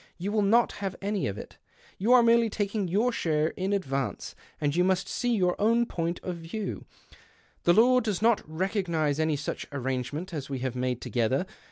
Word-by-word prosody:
You 185 +4 -3
will 215 0 +2
not 230 +4 +4
have 195 -2 -3
any 200 0 -1
of 100 0 -4
it. - - -10 0.4
^ou 220 +5 +2
are 250 -1 +7
merely 230 0 +4
taking 205 -1 -2
your 210 +8 +2
share 155 -7 0
in 190 +3 -3
advance, 140 -9 -2 0.3
ind 145 0 0
you 180 - +3
must 190 0 +1
see 245 -1 0
your 180 -3 +2
own 230 +3 +3
point 170 -5 -3
of 180 -2 -4
view, 180 +5 -5 0.8
rhe 175 +3 +5
law 250 +3 +6
does 215 -6 -2
not 230 0 +3
recognize 165 -4 -1
any 155 -1 +1
such 145 +1 -4
arrange 130 -2 -2
nent 170 +5 -6
as 140 -4 -5
we 135 - -3
have 130 -1 -3
made 125 -1 -2
together. 130 +7 0
180 Hz, 195 wpm, -28 LUFS, 150-210 Hz, 0.8 s, are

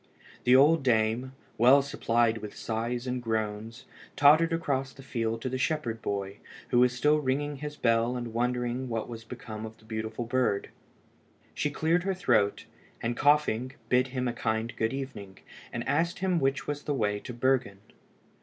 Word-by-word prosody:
The 125 - +6
old 150 +4 +6
dame, 120 +1 +1 0.3
well 130 +4 +7
supplied 115 -4 +1
with 105 -1 -8
sighs 120 +2 -3
and 125 -1 -2
groans, 110 0 -3 0.3
tottered 155 +4 +6
across 135 -5 -1
the 135 - -13
field 115 -3 -2
to - - -1
the 130 +1 -3
shepherd 135 -6 -1
boy, 100 -1 -3 0.3
who 120 - +3
was 125 0 +5
still 150 +5 +2
ringing 145 +1 -1
his 150 +1 -6
bell 115 0 +2
and 120 -2 -5
wondering 125 +1 -1
what 115 -2 -2
was 115 -1 -8
become 110 -3 -8
of 110 0 -8
the 110 - -22
beautiful 110 +1 -4
bird. 120 -4 0 0.8
She 150 - -1
cleared 160 +4 +1
her 190 +1 -1
throat, 110 - +1 0.3
and 120 +1 -2
coughing, 135 -4 +2 0.2
bid 125 +1 +3
him 130 -1 -2
a 120 - -1
kind 110 0 -2
good 110 0 0
evening, 130 -8 -6 0.3
and - - -4
asked 170 +4 +1
him 185 -2 +1
which 135 0 0
was 145 0 -3
the 145 -1 -2
way 105 -4 0
to 125 - -8
Bergen. 120 -4 0
125 Hz, 175 wpm, -28 LUFS, 115-140 Hz, 0.8 s, well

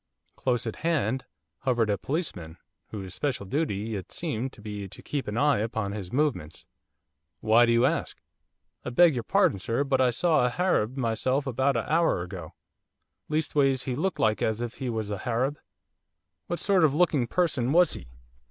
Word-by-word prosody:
Close 120 -3 0
at 115 - -4
hand 135 -7 0 0.3
hovered 120 -4 +1
a - - +2
policeman 100 - -4 0.3
whose 95 -4 -7
special 135 -6 -2
duty 110 -4 -2
it 95 - -7
seemed 135 -6 -3
to - - -16
be 105 -2 -6
to - - -12
keep 145 -2 -3
an 105 +2 -3
eye 145 -1 +3
upon 110 -2 -2
his 100 -4 -6
movements. 130 - -1 0.7
'Why 115 +2 +5
do - - +3
you 115 +2 +4
ask?' - - -1 0.6
'I - - -4
beg 165 +6 +5
your 120 - -2
pardon, 180 - +2
sir, 115 +8 0
but 135 -2 +1
I 130 - +4
saw 155 +4 +2
a 125 - +3
Harab 130 - 0
myself 130 +3 0
about 135 0 +1
a 115 - -2
hour 160 - +2
ago, 90 -3 -8 0.7
leastways 145 -4 +1
he 130 - -2
looked 185 +8 -1
like 110 -1 +1
as 110 0 0
if 120 0 -5
he 130 -2 -3
was 110 -3 -3
a 100 - -3
Harab.' 130 +4 -1 0.9
'What 175 - -2
sort 195 -4 +3
of 150 -3 +4
a - - -2
looking 155 -8 +2
person 140 -5 +1
was 175 +3 +5
he? 65 - -8
125 Hz, 185 wpm, -27 LUFS, 110-145 Hz, 0.9 s, Why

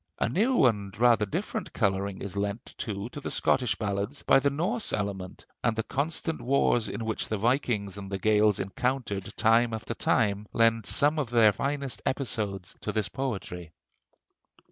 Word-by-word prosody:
A - - +1
new 215 - +3
and 100 -5 0
rather 115 -3 +4
different - - -4
coloring 100 0 -1
is 100 0 -6
lent, 100 +2 -3
too, 100 -1 -3
to 145 - -8
the - - -4
Scottish 125 -4 +2
ballads 100 +6 -3
by - - +5
the 140 - +2
Norse 185 - -1
element, 100 -3 -4 0.2
and 115 -2 +2
the 115 - -1
constant 160 +5 -2
wars 120 -4 +2
in 105 +4 -4
which 110 -1 -2
the 110 - -2
Vikings 105 -4 0
and 100 -1 -8
the 100 - -1
Gaels 105 +1 +3
encountered 105 -1 -2
time 115 +1 +3
after 110 +1 -5
time 105 -2 +1
lend 115 -2 +3
some 150 +2 +3
of 135 -6 -2
their 115 -3 +5
finest 140 +2 -3
episodes 105 -9 -2
to 105 - -2
this 105 -2 -1
poetry. 95 - -5
110 Hz, 165 wpm, -28 LUFS, 100-130 Hz, 0.2 s, by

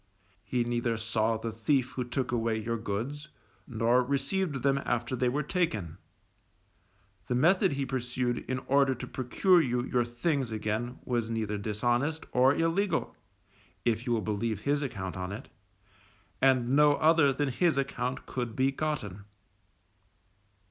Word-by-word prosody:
He 125 -2 0
neither 120 -1 -1
saw 110 0 0
the 115 +1 -4
thief 130 +3 0
who 125 - -3
took 125 +1 -2
away 115 -2 0
your 115 +1 -2
goods, 120 +8 -4 0.4
nor 120 +1 +2
received 140 +3 -1
them 140 0 +3
after 120 +2 -1
they 125 0 +1
were 145 +4 -1
taken; 110 - -2 1.3
the 125 - 0
method 175 - +4
he 140 0 -1
pursued 125 -1 -2
in 130 - 0
order 140 -1 +3
to - - -6
procure 170 +8 +3
you 125 -4 0
your 125 -1 +1
things 120 +2 -1
again 110 +3 -2
was 120 -3 -1
neither 110 -2 -2
dishonest 120 +9 -1
or 130 +3 +4
illegal, 165 +2 0 0.7
if 120 +1 0
you 120 - +2
will 115 - +1
believe 105 0 -2
his 145 +3 +1
account 100 -9 -4
on 90 0 -4
it, 100 - -8 0.9
and 130 -2 +4
no 145 +2 +5
other 160 -2 +4
than 140 +1 -1
his 160 +3 +1
account 130 -2 -2
could 120 -3 -4
be 135 +1 +2
gotten. 135 -10 -3
125 Hz, 150 wpm, -29 LUFS, 115-140 Hz, 1.3 s, no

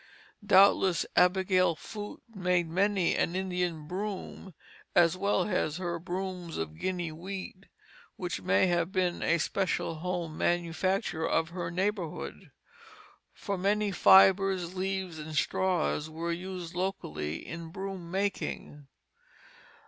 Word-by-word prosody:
Doubtless 195 -2 +5
Abigail 185 -1 +4
Foote 210 +5 -8
made 180 -3 +1
many 190 +1 +2
an 170 - 0
"Indian 180 -4 -2
broom," 190 -1 -5 0.4
as 170 0 +5
well 200 +2 +1
as 155 -5 0
her 175 -2 -3
brooms 180 -1 -4
of 80 -1 -5
Guinea 175 -3 -2
wheat, 190 +3 -7 0.5
which 175 - -4
may 95 - +3
have 175 0 +1
been 185 -2 0
a 170 - +3
special 170 0 -1
home 175 -2 -3
manufacture 175 +1 0
of 165 0 +1
her 170 -1 -4
neighborhood; 170 - -3 0.8
for 200 -2 -4
many 205 +2 +1
fibres, 190 -1 +5
leaves, 190 -3 -3
and 155 0 -7
straws 170 -4 0
were 165 +2 -3
used 180 0 -5
locally 80 - -3
in 165 0 -7
broom 190 -1 -6
making. 185 -6 -3
180 Hz, 120 wpm, -30 LUFS, 165-190 Hz, 0.8 s, Doubtless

